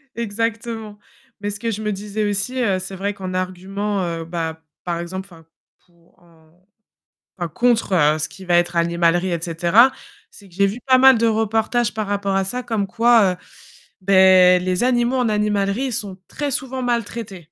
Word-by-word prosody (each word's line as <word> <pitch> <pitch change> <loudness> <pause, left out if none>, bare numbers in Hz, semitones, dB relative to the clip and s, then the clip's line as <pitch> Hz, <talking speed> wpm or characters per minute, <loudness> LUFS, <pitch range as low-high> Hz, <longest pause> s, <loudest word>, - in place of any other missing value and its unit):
Exactement. 225 -1 -4 0.4
Mais 205 - -2
ce 205 0 -5
que 230 -1 -2
je 215 +1 -5
me 210 -1 -2
disais 205 +1 -3
aussi, 205 +6 -2
heu, 195 -5 +1
c'est 190 +1 -6
vrai 200 +2 -3
qu'en 185 -2 -6
argument, 190 +2 -3
heu, 165 -1 -4
bah 160 -1 -4 0.2
par 170 -1 -3
exemple, 185 +3 -6
enfin 165 -1 -16 0.4
pour, 170 0 -30
heu, 160 -2 -24 0.9
enfin 175 -1 -3
contre, 235 +1 +1
heu, 155 -2 +3
ce - - -1
qui 190 - -13
va 175 -1 +2
être 175 0 0
animalerie 170 +1 +1
et 170 -1 -2
cetera, 175 +10 +4 0.4
c'est 200 -2 -17
que 170 - -19
j'ai 200 +1 +3
vu 205 +5 -3
pas 260 0 +6
mal 265 -2 +7
de 230 +1 +2
reportages 225 +1 0
par 215 -2 -3
rapport 200 -1 -1
à 195 - +2
ça, 250 +5 -3
comme 220 -4 -2
quoi, 225 -3 +4
heu, - - -9 0.7
bah 185 -1 +6
les 185 +4 -1
animaux 245 0 +1
en 245 -3 +1
animalerie 210 +4 0
sont 200 -4 -4
très 290 -2 -4
souvent 260 0 -3
maltraités. 230 -4 -3
200 Hz, 185 wpm, -20 LUFS, 180-230 Hz, 0.9 s, mal